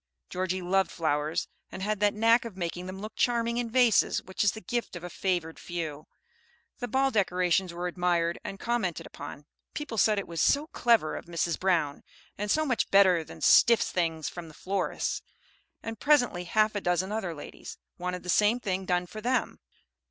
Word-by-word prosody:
Georgie 185 0 -2
loved 190 +1 +2
flowers, 155 -1 -1 0.2
and 190 - -6
had 210 0 -1
that 205 0 +2
knack 230 +2 +4
of 225 -5 -8
making 175 0 -4
them 190 +1 -7
look 215 +2 -7
charming 235 -1 +1
in 240 -1 -1
vases 245 -2 +4
which 190 +2 -2
is 205 - +3
the 220 - -7
gift 240 -5 -3
of 175 - -7
a 175 - -6
favored 175 -4 -2
few. 160 -4 -5 0.7
The 245 - -3
ball 270 +3 +2
decorations 185 -3 +1
were 175 +1 -5
admired 175 -1 0
and 195 - -6
commented 230 -8 -1
upon; 145 0 -9 0.3
people 275 -8 -3
said 215 0 +4
it 200 - -3
was 165 -2 -3
"so 285 +2 +3
clever 230 -10 +3
of - - -7
Mrs. 170 -1 -1
Brown," 165 -7 +1 0.3
and 210 +1 -4
"so 310 +8 +2
much 255 -5 0
better 185 -4 +5
than - - -12
stiff 235 -1 +6
things 165 -3 -1
from 170 -2 -7
a - - -14
florist's," 195 0 -2 0.6
and 225 -2 -6
presently 245 -12 +3
half 215 +4 +2
a 205 - -2
dozen 180 +2 0
other 190 -6 -3
ladies 145 - -9 0.2
wanted 180 0 -3
the - - -11
same 210 +6 +3
thing 190 -4 -2
done 180 -1 +1
for 215 +4 -9
them. 250 +2 0
190 Hz, 190 wpm, -28 LUFS, 175-225 Hz, 0.7 s, stiff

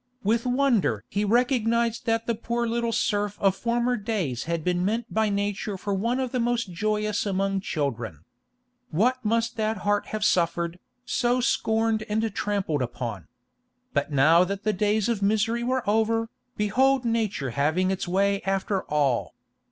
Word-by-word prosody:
With 230 +4 +1
wonder 245 - +2
he 205 - -1
recognised 235 +1 +1
that 225 0 +1
the 235 - 0
poor 235 +2 -2
little 235 0 -1
serf 205 -2 0
of 195 -1 +3
former 240 +3 0
days 195 - -2
had 165 -1 -2
been 180 +1 0
meant 225 +4 -2
by 220 0 +2
nature 200 0 -2
for 200 +2 -3
one 230 +6 0
of 260 -2 -2
the 255 - -1
most 235 -4 0
joyous 210 +2 0
among 195 -1 0
children. 120 - -3 0.7
What 250 +10 +1
must 230 +2 0
that 220 0 0
heart 205 0 +1
have 215 -1 -2
suffered, 170 0 +1 0.3
so 245 0 +1
scorned 225 -3 +1
and 220 +1 0
trampled 195 -8 -1
upon! 115 - -4 0.7
But - - 0
now 155 +5 +5
that 195 +2 -4
the 215 - +1
days 210 +1 +1
of 230 -4 -1
misery 220 +3 +1
were 255 -1 -1
over, 225 +2 +1 0.3
behold 255 +5 +2
nature 215 - -1
having 155 +8 +1
its 190 -1 -3
way 195 +2 +1
after 195 0 -1
all. 140 -5 0
210 Hz, 160 wpm, -26 LUFS, 185-230 Hz, 0.7 s, now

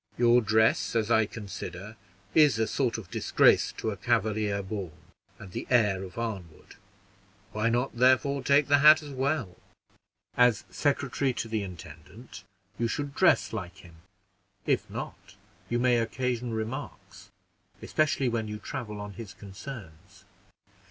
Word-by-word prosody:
"Your 120 0 +5
dress, 110 +1 +2
as 115 0 +1
I 110 -2 +4
consider, 100 -1 -8 0.4
is 150 -7 +5
a 110 - +2
sort 125 0 -1
of 100 -6 -10
disgrace - - +3
to 110 - -3
a 100 - -6
Cavalier 105 -1 0
born, 95 -4 -5 0.4
and 100 -2 -11
the - - -6
heir 105 -6 +3
of 95 +1 -9
Arnwood; 100 -9 -6 0.8
why 110 +2 0
not, 120 +3 -1
therefore, 130 +3 +3
take 140 +2 +4
its 145 0 +3
hat 155 +1 +8
as 145 - -9
well? 135 - -2 0.8
As 125 -2 +4
secretary 140 -2 0
to 115 - -4
the 110 -1 -2
intendant, 90 +5 -11 0.4
you 115 - +1
should 145 +4 -3
dress - - +3
like 85 -1 -6
him; 85 -2 -16 0.7
if - - 0
not, - - -8 0.3
you 120 - 0
may 125 0 +3
occasion 125 +1 -2
remarks, 110 +3 -6 0.5
especially 150 -3 0
when 115 -2 -1
you 105 0 -5
travel 105 -1 -6
on 105 0 -7
his 110 -2 -9
concerns." 100 - -11
115 Hz, 145 wpm, -28 LUFS, 100-125 Hz, 0.8 s, hat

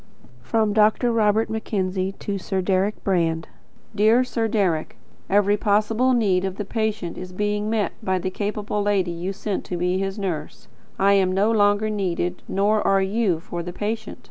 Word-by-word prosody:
From 215 - +1
Dr. 220 +3 +3
Robert 220 -1 +2
Mackenzie 195 -3 -2
to 200 0 -4
Sir 190 +1 -2
Deryck 190 +2 +1
Brand. 165 -4 0 0.5
Dear 220 +4 +4
Sir 230 -3 -1
Deryck: 190 -8 0 0.3
Every 205 +1 +3
possible 215 +5 +2
need 195 -6 +2
of 190 -1 -2
the 210 - -4
patient's 220 -5 -2
is 185 0 -7
being 210 +2 -1
met 220 -2 0
by 190 -3 0
the 185 +1 -3
capable 205 +1 -2
lady 200 -4 +1
you 170 +3 -4
sent 200 0 -3
to 180 - -4
be 180 +2 0
his 195 +1 -3
nurse. 175 -7 -4 0.3
I 200 +1 +4
am 190 -2 +3
no 200 +4 +2
longer 205 0 +3
needed. 180 -3 -2
Nor 205 +2 +2
are 195 0 +3
you 195 -3 +1
for 170 +1 -6
the 175 +1 -6
patient. 215 +2 -4
200 Hz, 170 wpm, -23 LUFS, 185-215 Hz, 0.5 s, Dear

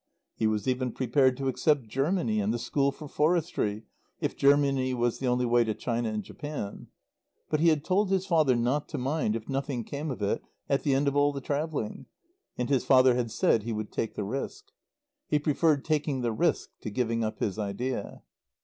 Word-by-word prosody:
He 110 - 0
was 110 +2 -1
even 130 -1 0
prepared 130 0 +2
to 135 -1 -2
accept 135 -1 +1
Germany 135 - 0
and 105 +1 +1
the 120 - 0
School 140 +3 +1
for 150 +2 -10
Forestry 150 - 0 0.4
if - - -2
Germany 140 -2 +3
was 120 -1 0
the 130 - -1
only 125 0 +2
way 120 0 +4
to 110 -2 -2
China 115 +1 -1
and 105 -1 -3
Japan. 145 -9 -6 0.6
But 155 - +2
he 165 - +4
had 155 -2 +1
told 195 +2 +2
his 190 -1 +1
father 155 -8 +3
not 125 +5 0
to - - -4
mind 130 -3 0
if 115 -1 -5
nothing 135 -3 -2
came 145 +6 -5
of 125 -6 -4
it 100 - 0 0.3
at 140 - +1
the 140 -3 +2
end 140 +1 +1
of 140 - +1
all 145 0 +4
the 140 - -5
travelling. 145 -4 -3 0.5
And 125 - -1
his 135 -3 +2
father 130 0 +6
had 120 -1 -1
said 110 0 +2
he 115 +2 -4
would 110 -1 -4
take 110 -2 -3
the 105 - -2
risk. 135 - -5 0.6
He 150 - +2
preferred 150 0 +2
taking 150 -3 0
the 120 -1 0
risk - - 0
to - - -5
giving 115 +1 -1
up 110 0 -2
his 105 +1 -2
idea. 110 +6 -3
130 Hz, 205 wpm, -28 LUFS, 115-145 Hz, 0.6 s, father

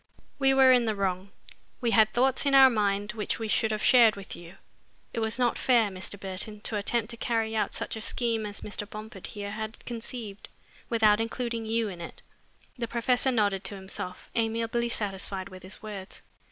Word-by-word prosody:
We 270 -1 +4
were 265 -1 +7
in 245 -2 +5
the 220 -1 0
wrong. 190 -1 -2 0.5
We 235 -3 0
had 220 -2 +5
thoughts 260 +4 +2
in 275 - +4
our 265 -1 +9
mind 205 -2 0
which 215 -2 -2
we 225 - -4
should 220 +1 +2
have 215 -1 -2
shared 235 -3 +7
with 200 -1 -7
you. 175 +1 -12 0.6
It - - -2
was 220 +1 +1
not 245 -2 +1
fair, 235 -5 +3
Mr. 190 +1 -6
Burton, 195 +2 -5
to 220 - -3
attempt 220 +2 0
to 235 - -7
carry 225 -1 -1
out 215 - 0
such - - -4
a 220 - -6
scheme 230 -2 -1
as 205 - -7
Mr. 210 0 -5
Bomford 215 -2 -8
here 205 -1 -6
had 220 +1 -6
conceived, 230 -3 -6 0.4
without 220 -2 +4
including 230 -1 -3
you 225 0 +1
in 180 -4 -7
it." 170 - -9 0.6
The 235 - -2
professor 245 +3 +2
nodded 205 -5 +1
to 200 - -3
himself, 190 -1 -7
amiably 230 +1 0
satisfied 195 -3 -3
with 185 -1 -11
his 190 +4 -9
words. 205 -3 -8
220 Hz, 195 wpm, -28 LUFS, 200-235 Hz, 0.6 s, our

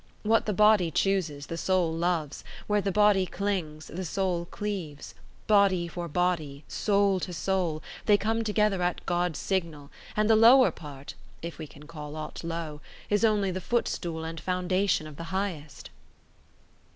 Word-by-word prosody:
What 220 +1 +2
the - - +2
body 210 -3 +5
chooses, 160 -5 0
the 165 - -5
soul 185 -4 +1
loves; 165 -3 -1 0.2
where 210 0 +1
the 195 - -1
body 205 -2 +4
clings, 175 -7 -3
the 185 +3 -6
soul 180 0 -1
cleaves; 175 -7 -5 0.3
body 195 -4 +4
for 170 +1 -5
body, 160 -4 -1
soul 200 -2 +2
to 180 - -4
soul, 175 -3 -1 0.2
they 205 -1 +6
come 225 +2 0
together 210 -3 +1
at 175 0 -1
God's 175 -2 0
signal; 165 -7 -3 0.3
and 215 0 +3
the 220 - +6
lower 240 +4 +7
part 145 -3 -10 0.3
(if 170 0 -6
we 155 - -6
can 145 +1 -15
call 150 -2 -8
aught 155 +1 -6
low) 165 -3 -5 0.3
is 205 +2 +2
only 210 -3 +3
the 185 +1 -4
footstool 175 -6 -2
and 165 0 -6
foundation 185 -1 0
of 155 -2 -10
the 165 - -6
highest." 170 -4 -4
180 Hz, 160 wpm, -28 LUFS, 160-200 Hz, 0.3 s, lower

